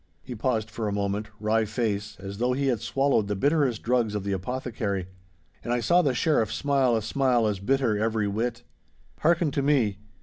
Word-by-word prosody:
He 125 - -7
paused 115 -1 -1
for 110 0 -3
a - - -1
moment, 100 +1 -2
wry 110 +1 +2
face, 105 -2 -2
as 100 +1 -7
though 125 +1 +1
he 135 +1 0
had 120 -5 0
swallowed 135 -4 +1
the 105 - -1
bitterest 140 0 +1
drugs 115 -3 +1
of 105 - -2
the 100 - -2
apothecary. 100 -2 -3 0.6
And 120 - -3
I 120 - +2
saw 175 +9 +4
the 140 -6 +1
Sheriff 120 -6 +2
smile 135 -4 +2
a 110 - -1
smile 125 -2 +2
as 105 -3 0
bitter 120 0 +1
every 110 -1 0
whit. 115 +3 -2 0.6
'Hearken 170 -1 +2
to 140 - 0
me. 125 -9 +2
115 Hz, 195 wpm, -26 LUFS, 105-130 Hz, 0.6 s, saw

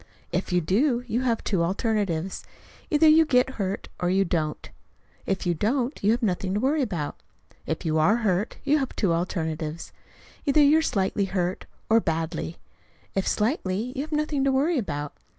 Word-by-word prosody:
If 180 +2 -2
you 180 0 +3
do, 235 - +1
you 240 +1 -1
have 235 -3 0
two 190 -5 0
alternatives: 190 -1 -1 0.5
either 310 +1 +4
you 315 +1 +7
get 260 -3 +2
hurt 195 +1 -3
or 175 - 0
you 195 +1 +3
don't. 155 -3 -2 0.6
If 190 -1 -1
you 175 - +2
don't, 240 - -1
you 205 - +3
have 235 +2 +2
nothing 190 -1 0
to - - +1
worry 285 +6 +1
about. 170 - -3 0.5
If - - -3
you 160 0 +1
are 190 +8 +4
hurt, 195 +2 0
you 295 +2 +3
have 270 - -3
two 190 -6 +1
alternatives: 160 -2 -3 0.5
either 285 +1 +3
you 295 +3 +6
are - - +1
slightly 200 -7 0
hurt 185 -1 -2 0.2
or 225 +1 +5
badly. 165 -2 -3 0.6
If 195 - -1
slightly, 215 - 0
you 270 - -1
have 305 +2 -6
nothing 300 -2 0
to 275 - +3
worry 285 +4 +2
about. 150 -8 -4
200 Hz, 180 wpm, -25 LUFS, 175-265 Hz, 0.6 s, you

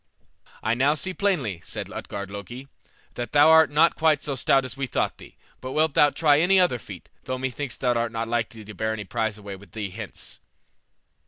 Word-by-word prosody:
"I 110 - +1
now 135 +5 +2
see 185 +4 -2
plainly," 140 - -1
said - - -6
Utgard 100 -1 -6
Loki, 110 +7 -8 0.5
"that 120 -2 -6
thou 150 +2 +7
art 160 0 +7
not 155 +3 +4
quite 155 -2 +2
so 145 - -2
stout 135 +1 +2
as 125 -1 -7
we 135 -1 -3
thought - - -1
thee: - - -14 0.2
but 130 +1 -6
wilt 155 -1 +2
thou 145 - +5
try 145 -1 +3
any 190 +4 +4
other 175 -10 +2
feat, - - -11 0.2
though 130 - -3
methinks 130 0 -4
thou 125 -1 +1
art 115 -1 -1
not 115 0 -3
likely 115 -2 -3
to 105 - -9
bear 110 +3 -2
any 105 -2 -5
prize 110 0 -2
away 100 -2 -8
with 100 +1 -16
thee 105 -4 -4
hence." 110 +1 -9
125 Hz, 205 wpm, -25 LUFS, 110-150 Hz, 0.5 s, thou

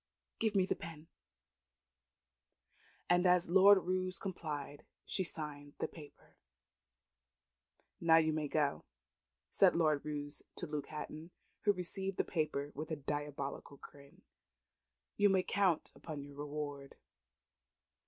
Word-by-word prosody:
Give 220 -2 +1
me 190 -2 +4
the - - 0
pen." 160 -2 -9 2.0
And 175 +1 +4
as 180 -1 +4
Lord 195 +1 +7
Roos 185 0 -1
complied, 150 -6 -5 0.2
she 190 - -1
signed 145 -4 -5
the - - -1
paper. 150 -4 -14 1.6
"Nov 165 -1 +6
you 155 - +1
may 155 -1 -1
go," 145 -1 0 0.7
said - - +5
Lord 155 -4 +2
Roos 145 -1 -4
to - - -4
Luke 150 -3 -4
Hatton, 155 +1 -7 0.4
who 205 - +7
received 190 +1 -3
the - - +3
paper 150 -3 -1
with 155 +3 -5
a 160 - -1
diabolical 145 -1 -4
grin. 140 0 -15 0.9
"You 205 0 +5
may 190 -1 +3
count 185 -5 +1
upon 150 -4 -7
your 140 0 -11
reward." 145 -1 -5
155 Hz, 125 wpm, -35 LUFS, 145-180 Hz, 2.0 s, Lord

